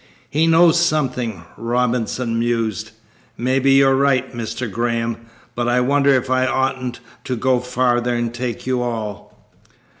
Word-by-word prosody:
"He 160 +3 +2
knows 165 +1 +5
something," 125 - -1
Robinson 120 0 -1
mused. 115 -2 -1 0.5
"Maybe 130 +2 +2
you're 135 0 +5
right, 135 -1 +1
Mr. 115 +1 -4
Graham, 115 +1 -2 0.3
but 120 0 -2
I 120 +1 +2
wonder 140 +2 +2
if 130 0 0
I 130 0 +1
oughtn't 130 -2 -1 0.3
to 130 - -2
go 130 +1 +1
farther 125 -1 0
and 120 -1 -2
take 120 -1 -4
you 130 -1 0
all." 110 -5 -6
125 Hz, 140 wpm, -20 LUFS, 115-130 Hz, 0.5 s, knows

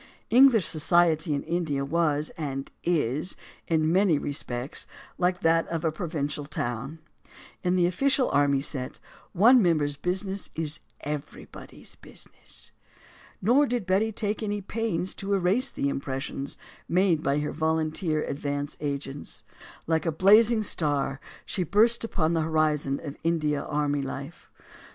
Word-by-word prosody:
English 240 - +6
society 160 0 +3
in 140 -1 -1
India 160 -4 -1
was, 155 -1 0
and 135 -3 -4
is, 155 -1 0 0.3
in 160 -1 +2
many 185 -3 +4
respects 135 -2 -3 0.3
like 180 0 +1
that 165 0 +3
of 165 -1 -3
a 160 - +2
provincial 150 -4 -3
town. 135 +1 -4 0.7
In 180 0 +2
the 180 -1 +3
official 260 +9 +2
and - - -1
army 140 -1 +2
set, 135 -3 -2 0.4
one 235 +7 +6
member's 150 -6 +1
business 190 +4 -2
is 155 -1 -3 0.2
everybody's 150 0 -8
busi - - -7
ness. - - -7 0.7
Nor 265 +8 +4
did 240 -5 -2
Betty 195 +4 +2
take 215 0 -2
any 205 -1 -2
pains 190 -3 -2
to 200 0 -1
erase 195 +8 +2
the - - -3
impres 135 -1 -2
sions 140 +1 -5 0.3
made 175 -3 +3
by 140 0 +1
her 150 0 -1
volunteer 160 0 0
advance 145 0 -3
agents. 140 -1 -5 0.4
Like 160 +1 0
a - - +2
blazing 215 +7 +5
star, 145 -7 0 0.3
she 190 - -1
burst 215 +8 +3
upon 170 -7 0
the 165 - +1
horizon 155 -3 +1
of 145 -2 -7
India 155 -3 +1
army 145 -1 -1
li 135 +1 -5
f 175 - -22
e. - - -26
160 Hz, 145 wpm, -27 LUFS, 145-185 Hz, 0.7 s, English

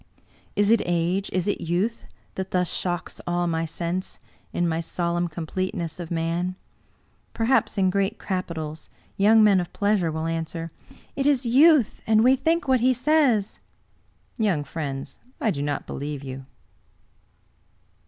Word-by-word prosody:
Is 205 +1 +3
it 230 - +5
age, 175 +3 0
is 185 0 -1
it 205 - -1
youth, 185 +8 -1 0.3
that 190 0 -4
thus 180 -1 0
shocks 175 -2 -3
all 175 0 +1
my 165 -1 0
sense, 170 +3 -3 0.3
in 175 - 0
my 160 -1 0
solemn 175 +1 -1
completeness 170 0 -4
of 170 -2 -6
man? 170 +2 -1 0.8
Perhaps, 230 -1 +2
in 190 -1 +3
grest 200 +3 0
capi 185 -3 -3
tals, 155 -1 -5 0.3
young 215 +2 +5
men 200 -3 +5
of 175 - -4
pleasure 200 -5 +1
will 160 +1 -3
answer, 165 0 -3 0.2
" - - -26
It 275 +1 0
is 275 -3 +3
youth; 275 +1 +5
and 220 0 +5
we 255 +2 +6
think 320 +3 0
what 260 -1 +4
he 255 +2 +3
says! 255 -6 +2 0.4
" - - -40
Young 190 -9 +1
friends, 140 -3 -5 0.2
I 220 - +1
do 140 - -3
not 145 -1 -2
believe 145 0 -5
you. 135 0 -7
180 Hz, 155 wpm, -25 LUFS, 165-220 Hz, 0.8 s, we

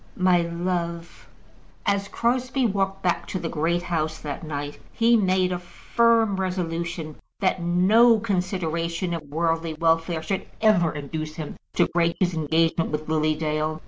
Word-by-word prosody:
my 185 -1 +4
love!" 170 0 -4 0.6
As 200 0 +1
Crosbie 255 +4 0
walked 195 -2 -1
back 180 -1 0
to - - -3
the 165 - -3
Great 170 +3 0
House 160 -2 -1
that 145 +1 -6
night, 145 -2 -5
he 235 +1 +3
made 185 -3 +2
a 180 - -2
firm 225 +3 +1
resolution 170 -4 -3 0.2
that 185 -2 +1
no 210 +7 +5
consideration 180 -4 -2
of 165 - -3
worldly 165 +1 -1
welfare 165 0 +1
should 190 +3 -3
ever 190 -7 +4
induce 155 +1 -5
him 155 -2 -6 0.2
to - - +4
break 170 -1 +1
his 180 -2 +1
engagement 160 +1 +1
with 150 0 -3
Lily 155 0 +2
Dale. 155 0 -2
170 Hz, 145 wpm, -24 LUFS, 160-190 Hz, 0.6 s, no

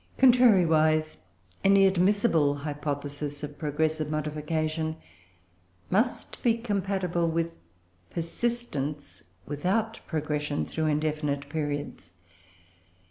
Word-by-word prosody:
Contrariwise, 165 -12 +5 0.5
any 195 0 +6
admissible 190 -5 +3
hypothesis 145 0 -4
of 145 0 -7
progressive 155 0 -1
modification 155 +1 -2 1.0
must 220 +7 0
be 230 -2 +3
compatible 195 -6 -1
with 165 0 -1 0.5
persistence 165 - -3 0.2
without 200 +10 -1
progression, 150 -2 -1
through 160 -1 -2
indefinite 150 -2 -1
periods. 145 - -4
155 Hz, 80 wpm, -28 LUFS, 150-190 Hz, 1.0 s, any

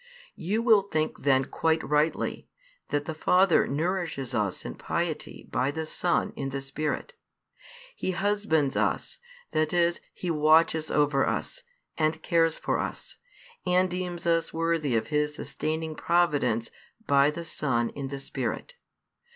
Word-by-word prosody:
You 210 +7 0
will 220 -4 +6
think 155 -5 -2
then 135 -1 +3
quite 160 +3 0
rightly 150 +2 0 0.4
that 145 0 -1
the 160 - -3
Father 180 +3 +4
nourishes 160 -3 -2
us 100 -3 -1
in - - -4
piety - - -4
by 130 +2 +1
the 160 +2 -3
Son 175 +2 0
in 135 -1 -3
the 135 +1 -3
Spirit. 150 - -3 0.8
He - - -3
husbands 190 -6 +1
us, - - -1 0.3
that 155 +1 +1
is 170 0 +2
He 180 - -3
watches 155 0 +4
over 145 -2 +2
us, - - -2 0.4
and 160 0 +1
cares 165 -1 +2
for - - -1
us, - - -5 0.5
and 180 0 +2
deems 180 -1 -4
us 165 -1 +2
worthy 165 -5 0
of 110 - 0
His 150 0 0
sustaining 160 +1 -3
providence 145 -10 +1 0.3
by 140 -2 +5
the 170 +3 -5
Son 120 -7 0
in 140 -1 -5
the 140 +1 -5
Spirit. 135 - -4
160 Hz, 145 wpm, -27 LUFS, 145-175 Hz, 0.8 s, will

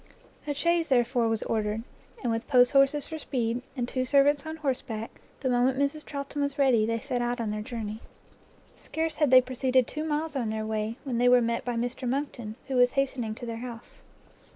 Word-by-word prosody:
A 290 - -1
chaise, 340 +2 +1
therefore, 240 -2 +2
was 225 -1 0
ordered; 215 0 -1 0.4
and 240 - +1
with 225 +1 -2
posthorses 275 +2 +4
for 320 -1 -6
speed, 240 -4 -1 0.2
and 245 -1 -1
two 255 +1 -1
servants 285 +3 +3
on 315 - -4
horseback, 260 -7 -4 0.2
the 265 - -1
moment 250 +1 +2
Mrs 280 +2 0
Charlton 280 0 -5
was 280 0 -1
ready, 250 -6 +4
they 230 0 0
set 255 -1 -2
out 240 0 -1
on 220 -2 -1
their 210 0 -3
journey. 220 -1 -5 0.7
Scarce 320 -1 -3
had 300 -3 +3
they 255 0 +8
proceeded 255 0 +1
two 305 +6 -5
miles 310 0 -2
on 240 -5 -1
their 220 0 -2
way, 220 +1 -2
when 255 -5 -2
they 245 0 +5
were 250 0 +7
met 235 0 -1
by 245 -1 -2
Mr 245 +2 -2
Monckton, 250 -5 -3
who 265 -2 -1
was 245 0 +5
hastening 260 -5 -1
to 240 - -8
their 230 -1 -4
house. 235 -1 -9
250 Hz, 200 wpm, -28 LUFS, 230-280 Hz, 0.7 s, they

